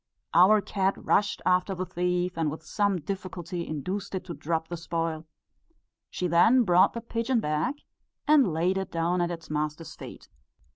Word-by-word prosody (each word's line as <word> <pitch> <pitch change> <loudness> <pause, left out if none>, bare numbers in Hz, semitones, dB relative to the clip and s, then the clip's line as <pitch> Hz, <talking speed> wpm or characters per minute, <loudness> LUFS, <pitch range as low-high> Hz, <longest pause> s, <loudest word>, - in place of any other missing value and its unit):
Our 195 +5 +6
cat 195 -1 0
rushed 205 0 +1
after 185 +1 +2
the 185 +1 -3
thief, 180 0 -1
and 160 -2 0
with 155 +2 -7
some 200 +1 0
difficulty 180 -1 -5
induced 185 +7 -4
it 185 - -3
to 170 - -6
drop 160 0 -2
the 175 - -5
spoil; 165 -1 -3 0.8
she 180 - -3
then 220 +9 +5
brought 185 -1 +4
the 235 - -5
pigeon 230 +2 -1
back 155 - -1 0.5
and 285 - +5
laid 175 +4 +1
it 190 - -4
down 170 +2 0
at 175 - 0
its 165 -2 -7
master's 150 +1 -3
feet." - - -11
180 Hz, 165 wpm, -27 LUFS, 165-195 Hz, 0.8 s, Our